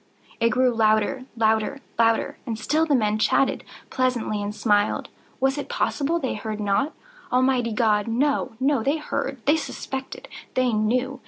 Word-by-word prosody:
It 230 - +3
grew 250 0 +2
louder—louder—louder! 225 +1 +1
And 225 -2 -2
still 310 +9 +1
the 290 - +3
men 215 -3 +1
chatted 270 - +2 0.3
pleasantly, 245 -5 0
and 205 +1 -4
smiled. 205 -2 +1 0.3
Was 270 +2 +1
it - - -6
possible 310 +4 0
they 265 -6 -2
heard 215 0 -5
not? 210 +9 0 0.4
Almighty 250 -2 +2
God!—no, 225 +6 +1
no! 270 -1 +2
They 280 +7 +1
heard!—they 280 -1 -1
suspected!—they 260 -3 -4
knew! 250 +5 0
245 Hz, 130 wpm, -24 LUFS, 215-270 Hz, 0.4 s, It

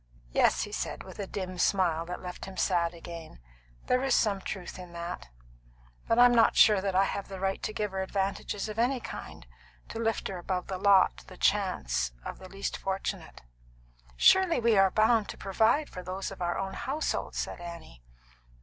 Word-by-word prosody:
"Yes," - - +3
he - - -7
said, - - -4
with - - -12
a 200 - -3
dim 185 -2 -5
smile 170 -3 +2
that 180 +1 -6
left 180 -1 -7
him 190 -1 -10
sad 175 -2 +1
again, 165 - -9 0.5
"there 250 - +2
is 270 -1 +2
some 200 -3 +2
truth 185 -1 -6
in 180 -1 -10
that. 170 - -6 0.8
But 230 - +2
I'm 245 0 +7
not 230 -1 +5
sure 210 -3 +6
that 195 -1 -2
I 190 - +5
have 195 0 -3
the 195 -1 -7
right 195 0 -1
to - - -2
give 210 -1 -2
her 190 0 -2
advantages 195 +2 -2
of 215 +1 -5
any 250 +2 +2
kind, 140 - -8 0.4
to - - -6
lift 225 -1 0
her 190 -2 -5
above 180 +1 -2
the 190 -1 -5
lot, 195 - +5
the - - -12
chance, - - +1
of - - -6
the 185 - -11
least 195 +1 -4
fortunate 195 0 -4 0.4
" - - -32
"Surely, 370 - +5
we 230 -1 +3
are 195 -1 +6
bound 220 +2 +3
to - - -7
provide 220 +9 +2
for 180 - -8
those 185 +2 -5
of 195 - -10
our 175 0 0
own 195 0 -3
household," 290 +9 -2
said - - -3
Annie. 170 - -9
190 Hz, 195 wpm, -29 LUFS, 175-215 Hz, 0.8 s, I'm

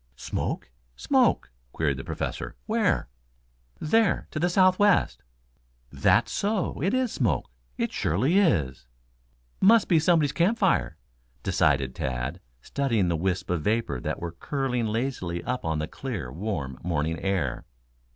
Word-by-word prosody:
"Smoke, 65 - -4 0.2
smoke?" - - +2 0.2
queried 70 -4 0
the 65 - -6
Professor. - - -4
"Where?" - - +1 0.7
"There, 220 +5 +2
to 155 - -3
the 175 +3 +2
southwest." 185 +2 +3 0.7
"That's - - +2
so, 200 -8 -1
it 190 +6 +1
is 255 -3 +1
smoke. 90 - -1 0.3
It - - -1
surely 130 - +2
is." 70 - +1 0.7
"Must 220 +3 +5
be 165 - +4
somebody's 155 -3 +3
camp 190 +9 +2
fire," 190 - +1 0.5
decided 70 -2 +2
Tad, 65 -1 -3 0.2
studying 115 -10 0
the 85 - +1
wisps 90 +2 -1
of 90 -3 0
vapor 105 - 0
that - - -3
were 85 -1 -4
curling 125 - -2
lazily 105 -7 -2
up 125 -1 -3
on 80 -4 -1
the 75 +1 -2
clear, 105 - -5
warm 75 - -4
morning 80 -1 -1
air. 90 -10 -1
105 Hz, 135 wpm, -26 LUFS, -, 0.7 s, Must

